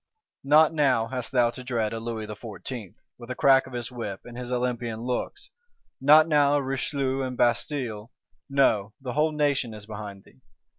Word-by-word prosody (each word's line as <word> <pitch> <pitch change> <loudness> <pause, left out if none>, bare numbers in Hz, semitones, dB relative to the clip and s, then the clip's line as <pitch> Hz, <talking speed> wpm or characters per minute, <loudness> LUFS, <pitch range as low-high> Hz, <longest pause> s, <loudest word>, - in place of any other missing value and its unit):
Not 150 +3 +5
now 130 -7 +2
hast 125 -3 -5
thou 120 -2 +3
to 125 - -9
dread 115 -4 -1
a 115 - -3
Louis 115 -1 -4
XIV., 105 0 -8 0.2
with 120 0 -11
the 125 - -3
crack 135 -1 +4
of 130 - -12
his 120 0 -4
whip, 105 -6 -5
and 120 - -10
his 125 0 -6
Olympian 120 -2 -2
looks; 125 - -4 0.5
not 155 +3 +7
now 145 -2 +4
a 145 - +1
Richelieu 135 0 -1
and 130 -1 -4
Bastilles: 120 -3 -1 0.4
no, 110 -7 +2
the 130 -3 -5
whole 155 +3 +2
Nation 140 -6 0
is 105 -1 -11
behind 105 -2 -8
thee. 130 - -23
125 Hz, 180 wpm, -26 LUFS, 115-135 Hz, 0.5 s, not